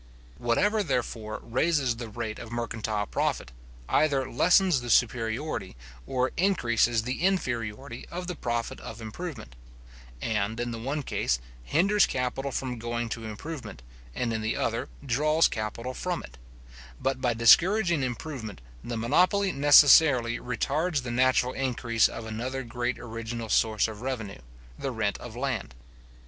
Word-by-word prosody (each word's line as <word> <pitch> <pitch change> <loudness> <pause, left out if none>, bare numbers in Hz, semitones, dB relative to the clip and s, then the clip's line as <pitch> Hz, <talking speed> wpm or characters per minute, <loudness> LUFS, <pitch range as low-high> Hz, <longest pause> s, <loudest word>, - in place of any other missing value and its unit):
Whatever, 205 - +2
therefore, 115 - -2
raises 130 -1 +1
the 115 -1 -6
rate 110 0 -5
of 115 - -9
mercantile 110 -3 -2
profit, 60 - -2 0.4
either 140 -4 +2
lessens 175 +2 +4
the 120 - -6
superiority, 115 - 0 0.3
or 130 0 0
increases 120 - +2
the 125 +6 -3
inferiority 125 - -2
of 180 +1 -5
the 180 - -3
profit 120 -6 -3
of 110 - -9
improvement: 115 - -7 0.6
and, 110 - -1
in 120 0 -2
the 115 - -5
one 140 +5 -3
case, 65 - 0 0.3
hinders 195 - +3
capital 125 +2 -2
from 125 -2 -3
going 120 0 -3
to 115 0 -5
improvement, 110 - -7 0.3
and 115 - -1
in 110 - -2
the 110 - -1
other - - -1 0.2
draws 155 +5 +3
capital 115 +3 -4
from 180 +5 -3
it; - - -13 0.6
but 135 0 -1
by 120 -2 +1
discouraging 170 - +5
improvement, 125 -4 -5 0.2
the 120 -1 -4
monopoly 180 - +3
necessarily 140 -4 +6
retards 140 +5 -1
the 120 - -4
natural 130 +1 +2
increase 120 -3 +1
of 115 - -7
another 125 +5 -4
great 120 +1 -2
original 115 0 -6
source 110 -1 +2
of 110 -1 -8
revenue, 115 - -4 0.4
the - - -2
rent - - -1
of - - -9
land. - - -3
120 Hz, 140 wpm, -27 LUFS, 115-145 Hz, 0.6 s, necessarily